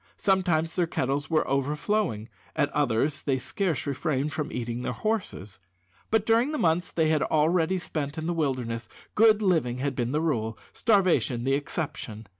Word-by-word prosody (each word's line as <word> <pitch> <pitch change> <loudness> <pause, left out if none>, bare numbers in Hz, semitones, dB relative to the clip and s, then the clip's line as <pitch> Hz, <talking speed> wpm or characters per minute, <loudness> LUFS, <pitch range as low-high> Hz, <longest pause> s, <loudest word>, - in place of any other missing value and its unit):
Sometimes 175 -4 +1
their 175 -2 +1
kettles 140 -1 -1
were 160 -2 +2
overflowing; 140 - 0 0.3
at 145 - +1
others 145 +1 +1
they 135 -2 0
scarce 185 - -2
refrained 140 +1 -1
from 150 0 -3
eating 120 0 -3
their - - -2
horses. 180 - -3 0.5
But 220 -1 +2
during 230 +5 +3
the - - -1
months 175 - +1
they 160 -2 +1
had 155 -2 +2
already 165 +4 +2
spent 150 -4 -4
in 160 - -3
the 175 - 0
wilderness 125 -8 -2 0.2
good 215 -1 +5
living 155 -11 +2
had 135 +1 -2
been 120 0 -1
the 150 - +1
rule, 115 -9 -1 0.2
starvation 185 - +2
the 135 +2 +1
exception. 140 -6 -4
150 Hz, 165 wpm, -27 LUFS, 130-180 Hz, 0.5 s, good